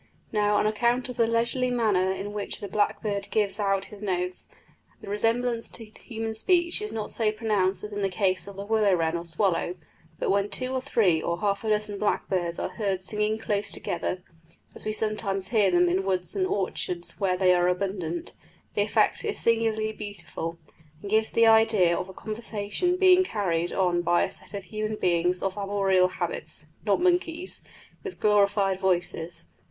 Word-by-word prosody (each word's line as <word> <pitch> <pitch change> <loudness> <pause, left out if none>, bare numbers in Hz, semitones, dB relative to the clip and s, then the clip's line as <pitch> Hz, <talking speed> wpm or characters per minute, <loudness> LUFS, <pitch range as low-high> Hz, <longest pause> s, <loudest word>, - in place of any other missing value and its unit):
Now, 210 -1 +2
on 205 - +2
account 240 +4 +1
of 250 - -7
the 230 - +3
leisurely 235 +2 +1
manner 210 -6 +2
in 195 +2 -4
which 205 -1 -4
the 200 - -5
blackbird 205 0 -1
gives 205 -2 0
out 195 -1 +1
his 205 - -11
notes, 180 -2 -2 0.5
the - - -12
resemblance 230 +3 0
to 230 - -8
human 225 +1 -6
speech 345 - +2
is 425 - -4
not 215 -2 -3
so 220 -2 +2
pronounced 210 -4 0
as 210 0 -6
in 205 - -3
the 195 - +1
case 185 -1 0
of 200 - -9
the 200 +1 -6
willow 210 -3 +3
wren 165 -1 0
or 170 0 -4
swallow; 175 +1 0 0.4
but - - 0
when 200 +1 +1
two 255 +6 -3
or 260 - -1
three 200 - +2
or 170 +1 -2
half 200 0 0
a 220 - -2
dozen 210 -1 -1
blackbirds 180 -4 -1
are - - -2
heard 195 -4 -2
singing 210 +2 0
close 205 -2 -1
together, 180 +1 -2 0.5
as - - -7
we 215 - 0
sometimes 210 -3 0
hear 210 -4 +3
them 175 0 +4
in 180 +2 +2
woods 185 -2 -1
and 375 -1 +1
orchards 180 - -2
where 185 -2 +1
they 185 -1 +4
are 175 0 +3
abundant, 180 -2 -2 0.4
the - - +1
effect - - +2
is 430 -2 -1
singularly 225 -1 +1
beautiful, 170 -5 -6 0.5
and 200 - -6
gives 220 0 +3
the 230 - +4
idea 220 -6 +5
of 180 - -4
a - - -9
conversation 220 - -2
being 370 0 +6
carried 175 - -1
on 180 -2 +1
by 175 0 +3
a - - -2
set - - -10
of 200 - -5
human 215 +4 -3
beings 180 -1 +1
of 195 -1 -1
arboreal 195 -2 +2
habits 175 -3 -5 0.2
(not 200 - +3
monkeys) 355 0 0 0.4
with 390 -3 -7
glorified 200 -2 +3
voices. 175 -3 -1
205 Hz, 185 wpm, -26 LUFS, 185-220 Hz, 0.5 s, being